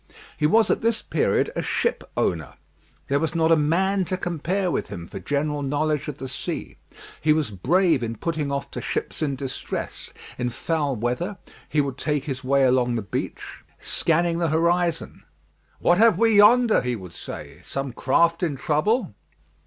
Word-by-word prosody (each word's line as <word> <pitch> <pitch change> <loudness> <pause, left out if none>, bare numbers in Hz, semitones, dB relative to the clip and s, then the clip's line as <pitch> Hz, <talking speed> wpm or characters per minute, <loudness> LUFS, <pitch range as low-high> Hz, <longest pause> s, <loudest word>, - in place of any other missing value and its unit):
He 150 - +2
was 220 +7 +4
at - - 0
this 230 0 0
period - - +1
a - - -1
ship 470 - -1
owner. - - -1 0.5
There 140 +1 +2
was 160 +2 -2
not 165 0 +3
a - - +8
man 185 +6 +2
to 185 - -2
compare 175 +2 -1
with - - -1
him 85 - -7
for - - -7
general 145 +8 -1
knowledge 145 +1 0
of 145 -2 -5
the 135 - -6
sea. - - -5 0.4
He 155 0 +4
was 155 -7 -1
brave 160 - +2
in 115 -1 -3
putting 155 +2 -2
off 140 0 -3
to - - -5
ships - - -3
in 145 -3 0
distress. 135 -1 -5 0.3
In 125 0 0
foul 145 +3 -1
weather 125 - -2 0.3
he 150 - +2
would 140 -2 -4
take 150 -3 -1
his 135 -3 -5
way 135 +1 +3
along 125 -2 +3
the 115 - -2
beach, 100 - -5 0.2
scanning 170 +1 +1
the 170 -2 +1
horizon. 170 +1 0 0.6
"What 175 +2 +3
have 225 -5 +6
we 225 0 +4
yonder?" 230 +2 +6
he 125 -1 -1
would 90 -5 -10
say; - - -8
"some 135 -2 -4
craft 170 +8 +2
in 165 -6 0
trouble?" 155 - 0
155 Hz, 175 wpm, -24 LUFS, 135-175 Hz, 0.6 s, a